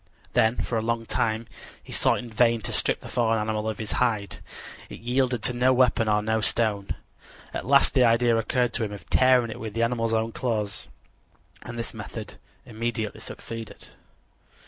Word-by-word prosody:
Then 110 +2 +3
for 115 -2 -1
a - - -2
long 115 0 -1
time 110 0 -1 0.4
he - - -9
sought - - +3
in 125 - -6
vain 115 0 +3
to - - -4
strip - - 0
the - - -9
fallen 115 -2 +1
animal 110 0 -1
of 110 - -4
his 110 -2 -5
hide. 110 -6 0 0.5
It - - -9
yielded 125 0 0
to 125 - +2
no 125 +2 +3
weapon 125 -3 +3
or 105 0 +2
no 110 0 +1
stone. 105 -2 0 0.6
At - - -4
last 140 0 +5
the 130 - +5
idea 115 0 +4
occurred 120 +2 +1
to 120 - -1
him 105 -1 -3
of 100 - -10
tearing 130 -3 +4
it - - -7
with 110 -1 -6
the 115 - +1
animal's 115 -1 +1
own 110 +1 0
claws, 110 -5 -2 0.7
and 120 -1 -8
this 115 - -4
method - - -8 0.3
immediately 110 -1 -3
succeeded. 115 -2 -8
115 Hz, 185 wpm, -26 LUFS, 110-120 Hz, 0.7 s, last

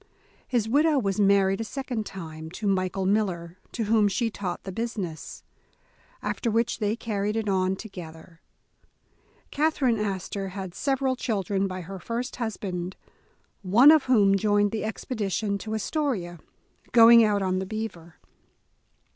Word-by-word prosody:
His 235 -4 0
widow 295 +5 +3
was 200 -6 0
married 195 0 +3
a - - -1
second 245 -2 -4
time, 160 -4 -8
to 210 - -6
Michael 190 -1 0
Miller, 185 -4 -1
to 230 - -2
whom 215 -1 +3
she 225 +4 -1
taught 185 -4 -5
the 190 - -6
business, 200 -6 -5 0.8
after 235 - -2
which 230 +2 0
they 210 0 0
carried 210 -2 -2
it 220 -1 -2
on 190 -1 +1
together. 165 -5 -11 1.1
Catherine 280 -6 +1
Astor 195 -1 -3
had 190 -3 -5
several 270 +1 0
children 200 -5 -1
by 185 -1 -5
her 190 +3 -8
first 235 +6 -4
husband, 190 -6 -4 0.7
one 225 +10 +7
of 315 -3 +4
whom 205 -6 +4
joined 205 0 +2
the 220 - -3
expedtion 210 -2 -2
to 220 +2 -4
Astoria, 215 - -2 0.5
going 230 0 +8
out 205 -2 +2
on 185 0 0
the 190 - -4
Beaver. 185 -7 -6
205 Hz, 140 wpm, -26 LUFS, 190-230 Hz, 1.1 s, going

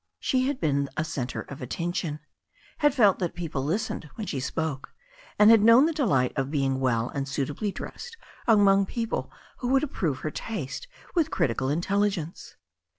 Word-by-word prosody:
She 255 0 +1
had 280 -1 -2
)^en 140 -3 +1
a 155 - +1
centre 130 -5 -3
of 140 - -10
attention, 165 +3 -3 0.6
had 295 -3 +3
felt 210 -8 +5
that 175 -3 -2
people 160 -6 -3
listened 160 0 -2
when 220 - -5
she 155 -8 -3
spoke, 135 +2 -3 0.4
and 210 +1 +8
had 225 -2 +7
known 230 +6 +7
the 330 - 0
delight 165 - +1
of 135 -2 -1
being 135 -3 0
well 120 -2 +1
and 140 -1 -3
suitably 145 +9 -2
dressed 460 - -8 0.3
among 200 -3 +5
people 230 0 -3 0.3
who 245 - -3
would 265 +2 +3
approve 165 - -2
her 155 - -3
taste 210 - -5 0.3
with 325 -3 +2
critical 130 - 0
intelligence. 185 +1 -1
170 Hz, 165 wpm, -27 LUFS, 140-225 Hz, 0.6 s, and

